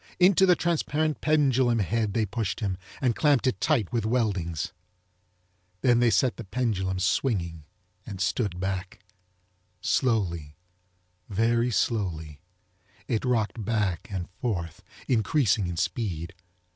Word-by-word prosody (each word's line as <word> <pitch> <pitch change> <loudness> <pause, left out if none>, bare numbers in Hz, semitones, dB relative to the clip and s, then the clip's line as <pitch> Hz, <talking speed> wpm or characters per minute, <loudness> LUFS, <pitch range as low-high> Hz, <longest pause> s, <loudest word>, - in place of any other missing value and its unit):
Into 190 +1 +6
the 180 - +6
transparent 155 -2 0
pendulum 135 -6 +3
head 110 0 0
they 110 - +2
pushed 105 -1 -3
him 100 -4 -1 0.3
and 125 -4 +2
clamped 145 -4 +3
it 130 - 0
tight 125 - +1
with 115 -3 +1
weldings. 100 -9 -1 1.1
Then 120 -2 +4
they 120 -1 +4
set 115 +4 +2
the 120 - -6
pendulum 95 -4 -1
swinging 90 - 0 0.4
and 100 -2 -8
stood 95 -1 -1
back. 95 -1 -3 0.8
Slowly, 90 - 0 0.7
very 115 +4 +2
slowly, 85 - -1 0.7
it 110 - 0
rocked 115 -3 0
back 105 -5 -1
and 95 -4 -4
forth, 85 -9 -3 0.3
increasing 110 - +2
in 85 -1 -4
speed. 90 -4 -2
110 Hz, 120 wpm, -27 LUFS, 95-125 Hz, 1.1 s, Into